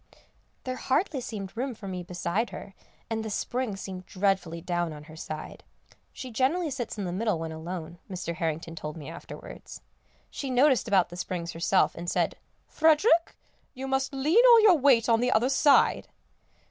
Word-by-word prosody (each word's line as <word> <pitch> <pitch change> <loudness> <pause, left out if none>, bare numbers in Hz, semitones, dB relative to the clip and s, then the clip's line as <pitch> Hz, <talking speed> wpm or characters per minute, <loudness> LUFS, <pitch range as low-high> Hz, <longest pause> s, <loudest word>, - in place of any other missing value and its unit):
There 255 0 -4
hardly 275 +1 0
seemed 205 -5 -6
room 250 +1 -3
for 205 -2 -9
me 185 -1 -4
beside 180 +5 -2
her, 195 - -9 0.3
and 225 -1 -2
the 220 - -4
springs 220 -1 -3
seemed 185 -1 -7
dreadfully 190 -4 0
down 175 -1 -2
on 150 -1 -10
her 155 +1 -13
side. 155 -1 -7 0.5
She 255 - -8
generally 295 +8 +1
sits 240 -3 -4
in 205 - -3
the 180 - -3
middle 205 0 0
when 160 0 -5
alone, 170 +1 -7
Mr. 180 -3 -4
Harrington 165 -1 -3
told 155 0 -6
me 150 -1 -8
afterwards. 170 - -10 0.5
She 275 - -5
noticed 260 0 +3
about 195 -5 +3
the 175 - -9
springs 170 -2 -4
herself, 170 +3 +2
and 170 +1 -5
said, - - 0 0.3
"Frederick, 325 +3 +3 0.4
you 265 +1 -5
must 270 +1 0
lean 300 - +3
all 475 -2 +8
your 400 -5 +7
weight 260 -5 +4
on 230 -1 +4
the 250 +1 +1
other 245 +2 +3
side." 280 +1 +4
205 Hz, 175 wpm, -27 LUFS, 175-265 Hz, 0.5 s, all